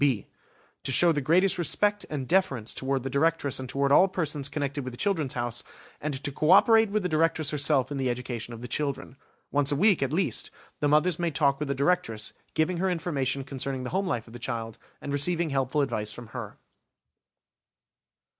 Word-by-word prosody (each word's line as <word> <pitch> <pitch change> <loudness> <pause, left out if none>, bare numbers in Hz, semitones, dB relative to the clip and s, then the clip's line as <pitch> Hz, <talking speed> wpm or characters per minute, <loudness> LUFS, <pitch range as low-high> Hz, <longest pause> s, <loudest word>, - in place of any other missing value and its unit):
(b) 130 -8 +2 0.6
To - - -3
show 170 +7 +5
the 150 -2 0
greatest 180 +7 +3
respect 205 +5 +1
and 140 -4 -4
deference 140 - +1
toward 135 -1 -2
the 135 - -3
Directress 145 -1 +1
and 130 -1 -6
toward 140 +2 0
all 185 +7 +7
persons 150 -7 -2
connected 140 -1 -3
with 130 -1 -6
the - - -8
"Children's 165 -8 0
House", 120 -1 -2 0.4
and 145 -1 -2
to 145 - -1
co 150 +3 -1
operate 220 +3 +6
with 210 0 -1
the - - +1
Directress 155 -2 +1
herself 145 -2 +2
in 145 - -3
the 130 -1 0
education 120 -1 -4
of 115 0 -9
the - - -5
children. 140 0 -3 0.4
Once 145 0 +1
a - - +2
week, 195 +2 +3
at 135 -1 0
least, 185 +5 -1 0.3
the 145 - +1
mothers 150 +3 +3
may 170 -1 +1
talk 140 -3 +1
with 150 - -2
the 140 - -1
Directress, 130 -7 0 0.2
giving 160 +3 +1
her 190 +2 0
information 140 -6 -1
concerning 135 -1 -4
the 125 - -5
home 190 +1 0
life 120 -9 -2
of 115 - -15
the 120 - -8
child, 115 -2 -5 0.2
and 140 - -4
receiving 165 +3 +1
helpful 135 +2 0
advice 105 -6 -2
from 115 +1 -9
her. - - -7
145 Hz, 200 wpm, -27 LUFS, 130-165 Hz, 0.6 s, all